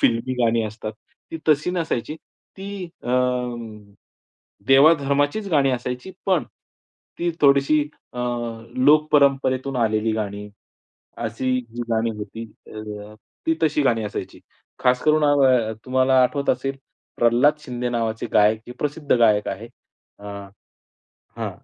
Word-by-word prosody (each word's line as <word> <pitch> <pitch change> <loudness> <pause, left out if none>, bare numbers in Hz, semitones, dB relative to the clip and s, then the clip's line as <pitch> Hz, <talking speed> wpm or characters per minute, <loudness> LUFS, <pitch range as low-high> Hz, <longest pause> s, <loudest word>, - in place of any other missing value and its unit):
फिल्मी 115 +2 +1
गाणी 115 0 +2
असतात. 110 0 -6 0.4
ती 165 - -5
तशी 155 +3 +3
नसायची. 160 -5 -2 0.4
ती 200 0 -6 0.2
अ, - - -7 1.6
देवाधर्माचीच 145 +6 +4
गाणी 140 -4 +3
असायची 125 +5 -4 0.2
पण 185 -5 +2 0.7
ती 175 0 0
थोडीशी 140 +1 +4 0.3
अ, 125 - -8 0.6
लोकपरंपरेतून 140 -2 +3
आलेली 110 -1 +1
गाणी, 105 -1 -4 0.7
अशी 115 +3 -3 0.4
गाणी 115 0 +1
होती. 110 +2 -7 1.0
ती 160 - +3
तशी 150 -2 +2
गाणी 115 -5 +2
असायची. 105 - -6 0.4
खास 125 0 +3
करून 155 0 +3
अ, 130 -6 +3
तुम्हाला 130 0 +3
आठवत 140 +3 +1
असेल 135 +2 -2 0.4
प्रल्हाद 120 +6 +3
शिंदे 125 -4 -4
नावाचे 115 -2 -2
गायक 105 +1 +4
हे - - -6
प्रसिद्ध 145 0 -1
गायक 105 -3 +3
आहेत. 105 +4 -6 0.5
अ 100 - -15 1.1
हां, - - -3
130 Hz, 115 wpm, -22 LUFS, 115-145 Hz, 1.6 s, देवाधर्माचीच